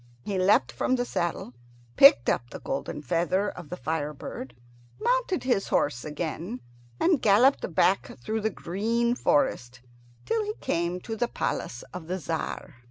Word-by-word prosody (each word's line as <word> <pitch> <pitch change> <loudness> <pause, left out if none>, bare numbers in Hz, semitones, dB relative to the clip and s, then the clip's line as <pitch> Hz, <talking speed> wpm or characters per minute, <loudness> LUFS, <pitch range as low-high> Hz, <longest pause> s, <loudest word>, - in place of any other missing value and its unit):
He 195 +4 -2
leapt 185 - +4
from 190 - 0
the 245 -1 -1
saddle, 170 - -3 0.4
picked 275 - +8
up 120 - 0
the - - -8
golden 140 +2 -4
feather 180 +8 +1
of 175 -4 -10
the 180 - -5
fire 150 -2 -2
bird, 130 -2 -8 0.4
mounted 480 -5 +1
his 245 -6 +1
horse 135 -4 0
again, 155 -2 -4 0.4
and 335 -6 +3
galloped 215 - +4
back 190 +2 +2
through 220 - -3
the 220 - +1
green 225 +6 -1
forest 185 - 0 0.4
till 450 -1 0
he 425 +1 -4
came 175 - -2
to 225 - -5
the 240 +2 0
palace 120 - -3
of 180 -3 -7
the 185 +2 -2
Tzar. 160 -5 -4
180 Hz, 160 wpm, -27 LUFS, 150-235 Hz, 0.4 s, picked